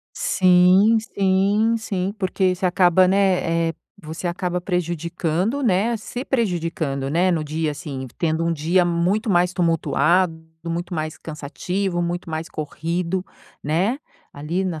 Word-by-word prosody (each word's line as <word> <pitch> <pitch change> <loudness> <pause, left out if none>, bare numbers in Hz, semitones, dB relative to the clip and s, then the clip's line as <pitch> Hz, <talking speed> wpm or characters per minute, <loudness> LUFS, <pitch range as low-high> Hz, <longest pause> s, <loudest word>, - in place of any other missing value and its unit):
Sim, 185 +4 +4
sim, 200 +2 +1
sim, 195 -3 -2
porque 185 -1 +1
você 185 +1 -1
acaba, 180 0 +4
né, 180 -4 +2
eh, - - -9 0.3
você 160 +3 -6
acaba 180 0 -2
prejudicando, 175 - -1
né, 225 +2 +2
se 245 +4 -6
prejudicando, 165 - -1
né, 175 +5 +2
no 165 -3 0
dia, 155 +1 -2
assim, 140 -4 -6
tendo 165 0 0
um 170 - +1
dia 165 +4 +2
muito 180 +6 0
mais 180 0 +2
tumultuado, 165 0 +2 0.3
muito 170 +2 -4
mais 155 -2 -3
cansativo, 175 +4 -3
muito 175 0 -3
mais 160 0 -4
corrido, 170 +4 -3 0.4
né, 185 - +1 0.4
ali, 160 +6 -2
na 165 -4 -4
175 Hz, 135 wpm, -22 LUFS, 165-190 Hz, 0.4 s, Sim